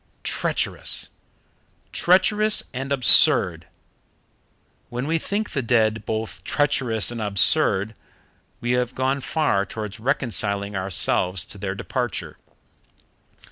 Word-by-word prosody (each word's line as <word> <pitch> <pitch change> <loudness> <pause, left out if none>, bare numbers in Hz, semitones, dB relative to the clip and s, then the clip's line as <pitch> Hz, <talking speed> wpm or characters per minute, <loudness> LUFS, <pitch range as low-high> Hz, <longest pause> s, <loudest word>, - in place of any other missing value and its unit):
Treacherous! - - 0 0.8
treacherous 210 +4 +3
and 135 +2 -5
absurd! 130 -3 +5 1.2
When 125 +2 -4
we 165 +2 0
think 205 +5 -3
the 140 - -2
dead 110 -3 +1
both 110 0 -4
treacherous 125 -7 +1
and 120 -1 -5
absurd, 105 0 +2 0.7
we 120 - -1
have 125 -1 -1
gone 130 +2 0
far 140 -10 0
towards 105 +1 -7
reconciling 105 -5 -2
ourselves 95 0 0
to 100 - -7
their 95 0 -4
departure. 120 +2 -4
120 Hz, 100 wpm, -23 LUFS, 100-135 Hz, 1.2 s, absurd